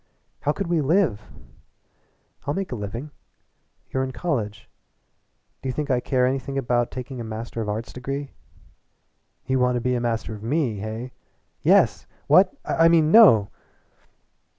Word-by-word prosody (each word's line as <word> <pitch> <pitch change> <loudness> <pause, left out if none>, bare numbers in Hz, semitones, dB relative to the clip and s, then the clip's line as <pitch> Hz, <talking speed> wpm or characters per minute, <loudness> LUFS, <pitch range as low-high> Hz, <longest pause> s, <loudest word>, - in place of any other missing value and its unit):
"How 145 - 0
could 200 +6 -3
we 170 -2 +1
live?" 150 - +2 1.3
"I'll 145 - 0
make 195 -1 -3
a - - -2
living." 115 +7 -6 0.8
"You're 130 - 0
in 130 - -3
college." 120 -9 -3 0.9
"Do 135 - -3
you - - -2
think 145 +1 -2
I 125 - +2
care 125 +1 +1
anything 135 +1 -2
about 120 -2 +1
taking 130 0 -7
a - - -4
Master 115 +1 -5
of 105 - -3
Arts 110 +3 -4
degree?" 135 +2 -5 1.1
"You 130 0 0
want 125 0 +2
to - - +1
be 125 0 0
Master 115 -2 -2
of 105 - -9
Me, 125 -1 -1
hey?" 110 +4 -5 0.5
"Yes! - - +3 0.2
What? - - +5
I 165 - +4
mean, 160 -2 +4
no!" 115 - +7
125 Hz, 150 wpm, -24 LUFS, 115-145 Hz, 1.3 s, no